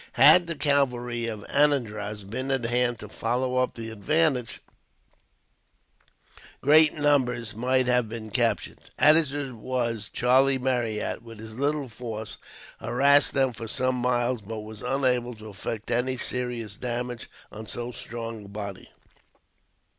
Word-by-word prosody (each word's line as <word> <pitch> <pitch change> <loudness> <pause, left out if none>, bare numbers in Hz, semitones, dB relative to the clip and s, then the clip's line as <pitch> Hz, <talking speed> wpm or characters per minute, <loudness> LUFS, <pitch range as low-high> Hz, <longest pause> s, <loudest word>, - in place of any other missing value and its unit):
Had 180 -1 +7
the 170 - -2
cavalry 125 -5 0
of 110 -3 -6
Anandraz 110 -8 +1
been 125 +7 -5
at 135 -3 0
hand 120 +1 +1
to 105 - -7
follow 125 +4 -1
up 130 0 +1
the 115 -1 -6
advantage, 130 +2 0 2.0
great 155 +2 +5
numbers 125 -7 +1
might 130 +3 +1
have 125 -2 +2
been 110 -1 -7
captured. - - 0 0.2
As 155 -2 +5
it 140 -2 -4
was, 115 -2 -3
Charlie 130 +2 +3
Marryat, 120 -6 -1
with 115 -1 -12
his 110 0 -9
little 145 0 0
force, 110 -2 -7 0.4
harassed 140 +5 +3
them 135 -2 +2
for 115 0 -7
some 130 +3 0
miles; 120 -1 0
but 110 +1 -6
was 105 0 -10
unable 125 -2 0
to 110 0 -10
effect 105 +3 -5
any 125 +2 0
serious 120 -4 -3
damage 120 -1 -4 0.2
on 110 0 -9
so 120 +2 -4
strong 115 -2 -6
a - - -11
body. 100 -1 -7
120 Hz, 140 wpm, -26 LUFS, 110-130 Hz, 2.0 s, Had